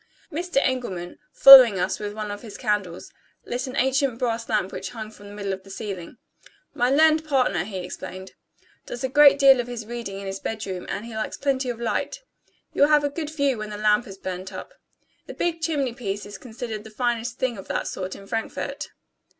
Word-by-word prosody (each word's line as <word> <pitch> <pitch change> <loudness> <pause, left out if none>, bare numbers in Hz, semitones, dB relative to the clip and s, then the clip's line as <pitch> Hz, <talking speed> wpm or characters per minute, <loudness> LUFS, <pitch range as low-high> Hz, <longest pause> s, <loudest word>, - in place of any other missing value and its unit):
Mr. 345 +1 -3
Engelman, 190 -9 -3
following 255 -7 +10
us 180 +1 -1
with 205 0 -5
one 215 -1 -4
of 205 - -7
his 220 -4 -10
candles, 205 -6 -2 0.3
lit 250 +2 -3
an 255 - -6
ancient 265 -1 +1
brass 230 -2 -2
lamp 205 -3 0
which 190 - -5
hung 215 +2 -8
from 205 -1 -14
the 205 - -11
middle 200 -2 -3
of 190 - -6
the 195 - -17
ceiling. 195 0 -7 0.6
"My 245 +1 +1
learned 310 +3 +4
partner," 260 - +1
he 200 -2 -6
explained, 185 +1 -7 0.6
"does 240 - -6
a 260 - 0
great 290 +1 +7
deal 270 -2 +7
of 245 - -2
his 240 -2 -6
reading 230 -4 -6
in 200 - -8
his 195 0 -4
bedroom, 200 -5 -5
and 205 - -4
he 235 - -9
likes 220 - -3
plenty 270 -2 0
of 235 -1 -4
light. 235 - -2 0.6
You - - -2
will 285 - +6
have 300 -1 +5
a 285 - +1
good 305 0 -4
view 280 -6 0
when 215 0 -5
the 210 - -6
lamp 210 +2 +2
has 195 -1 -10
burnt 185 0 -6
up. - - -9 0.5
The - - -8
big 335 -1 -1
chimney 285 -7 -1
piece 205 -5 -4
is 205 - -9
considered 225 -3 -6
the 220 - -11
finest 240 +1 -2
thing 245 -5 -2
of 190 - -10
that - - -2
sort 185 0 -5
in 195 - -12
Frankfort." 225 +2 -4
230 Hz, 215 wpm, -24 LUFS, 200-265 Hz, 0.6 s, following